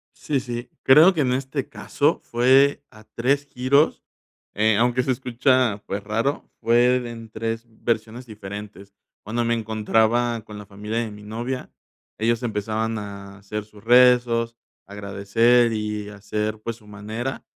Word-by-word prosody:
Sí, 145 Hz, -3 st, -1 dB
sí. 120 Hz, -1 st, -6 dB
Creo 155 Hz, +8 st, +7 dB
que 160 Hz, -, 0 dB
en 125 Hz, -3 st, +1 dB
este 130 Hz, 0 st, -3 dB
caso -, -, 0 dB
fue 135 Hz, +4 st, +3 dB
a 110 Hz, 0 st, -16 dB
3 135 Hz, +6 st, 0 dB
giros, 140 Hz, +3 st, +2 dB, 0.5 s
eh, 110 Hz, +1 st, +3 dB
aunque 120 Hz, +3 st, +2 dB
se 130 Hz, +1 st, +1 dB
escucha, 125 Hz, -3 st, +1 dB
pues 100 Hz, +1 st, -4 dB
raro, 115 Hz, +7 st, -2 dB
fue 120 Hz, +2 st, +4 dB
en 115 Hz, -1 st, -10 dB
3 115 Hz, +1 st, -4 dB
versiones 115 Hz, +2 st, -3 dB
diferentes. 100 Hz, -2 st, -9 dB, 0.3 s
Cuando 115 Hz, +3 st, -2 dB
me 115 Hz, 0 st, +1 dB
encontraba 110 Hz, +1 st, +1 dB
con 105 Hz, -1 st, -10 dB
la 105 Hz, -, -10 dB
familia 105 Hz, +3 st, -5 dB
de 115 Hz, -2 st, -2 dB
mi 105 Hz, 0 st, -11 dB
novia, 120 Hz, +5 st, -5 dB, 0.5 s
ellos 115 Hz, +2 st, +1 dB
empezaban 110 Hz, 0 st, -2 dB
a 100 Hz, -1 st, -9 dB
hacer 100 Hz, +1 st, -5 dB
sus 105 Hz, -1 st, -18 dB
rezos, 120 Hz, -1 st, +4 dB, 0.3 s
agradecer 105 Hz, +4 st, +2 dB
y 105 Hz, -1 st, -3 dB
hacer, 105 Hz, +1 st, -3 dB
pues, 115 Hz, -1 st, -3 dB
su 110 Hz, -2 st, -21 dB
manera, 110 Hz, +4 st, -5 dB
115 Hz, 145 wpm, -23 LUFS, 105-125 Hz, 0.5 s, Creo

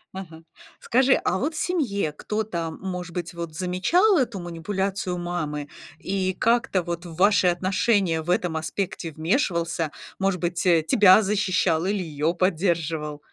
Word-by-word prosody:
Ага. 165 Hz, -4 st, -9 dB, 0.4 s
Скажи, 260 Hz, +2 st, +3 dB
а -, -, +1 dB
вот 310 Hz, +4 st, -2 dB
в -, -, -5 dB
семье 230 Hz, -, -1 dB
кто-то, 175 Hz, 0 st, -3 dB
может 180 Hz, +1 st, -6 dB
быть, 175 Hz, -1 st, -4 dB
вот 170 Hz, -2 st, -6 dB
замечал 310 Hz, -, +2 dB
эту 235 Hz, -7 st, -1 dB
манипуляцию 185 Hz, +2 st, -3 dB
мамы 155 Hz, -5 st, -4 dB, 0.3 s
и 190 Hz, -1 st, -1 dB
как-то 230 Hz, -4 st, +1 dB
вот 170 Hz, 0 st, -5 dB
в 165 Hz, -, -9 dB
ваши 195 Hz, 0 st, +4 dB
отношения 185 Hz, -1 st, +1 dB
в 160 Hz, -, -9 dB
этом 180 Hz, -4 st, +1 dB
аспекте 170 Hz, +1 st, -3 dB
вмешивался? 170 Hz, -, 0 dB, 0.3 s
Может 195 Hz, -1 st, 0 dB
быть, 175 Hz, 0 st, -2 dB
тебя 185 Hz, +4 st, +5 dB
защищал 190 Hz, -5 st, +1 dB
или 200 Hz, -2 st, 0 dB
её 155 Hz, 0 st, -1 dB
поддерживал? 165 Hz, -4 st, 0 dB
180 Hz, 140 wpm, -24 LUFS, 165-200 Hz, 0.4 s, тебя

